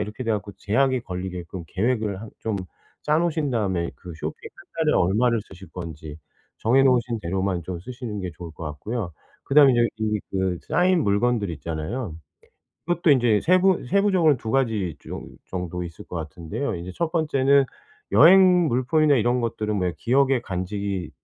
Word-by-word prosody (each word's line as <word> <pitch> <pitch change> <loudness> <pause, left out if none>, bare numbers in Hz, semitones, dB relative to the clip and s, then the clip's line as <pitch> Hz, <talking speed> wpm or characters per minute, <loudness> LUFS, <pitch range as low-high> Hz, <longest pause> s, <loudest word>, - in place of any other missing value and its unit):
이렇게 105 +4 -5
돼 115 - -1
갖고 105 -1 -2
제약이 130 +4 +1
걸리게끔 90 -1 -6
계획을 105 -2 -1
한 115 - -9
좀 110 -2 -2 0.5
짜 150 +1 +2
놓으신 160 -4 0
다음에 95 -8 -1
그 90 -2 -10
쇼핑 - - -6
1 - - -15 0.2
달에 150 - +3
얼마를 115 +6 +2
쓰실 95 -2 -14
건지 80 -4 -7 0.4
정해 130 +5 +4
놓으신 125 -3 +2
대로만 95 0 -1
좀 90 +1 -5
쓰시는 120 -2 -6
게 90 -1 -4
좋을 85 -2 -8
것 85 - -9
같고요. 90 +6 -4 0.3
그다음에 140 -1 +6
이제 120 -1 +3
이 105 -1 0
그 95 -2 0
쌓인 180 -1 +3
물건들 105 0 +1
있잖아요. 80 - -4 0.7
그것도 175 -2 +2
인제 120 -6 +4
세부 185 0 +3
세부적으로는 185 -5 +3
2 110 - -5
가지 110 - 0
좀 - - -8 0.2
정도 90 -1 -4
있을 85 -2 -9
것 - - -9
같은데요. 85 - -4
인제 90 +2 -7
1 170 -1 -1
번째는 140 -4 +3 0.5
여행 180 - +7
물품이나 140 +4 +3
이런 120 +1 +2
것들은 105 -2 -2
왜 90 -1 0
기억에 135 +1 +2
간직이 95 -3 -4
110 Hz, 340 characters per minute, -24 LUFS, 90-135 Hz, 0.7 s, 여행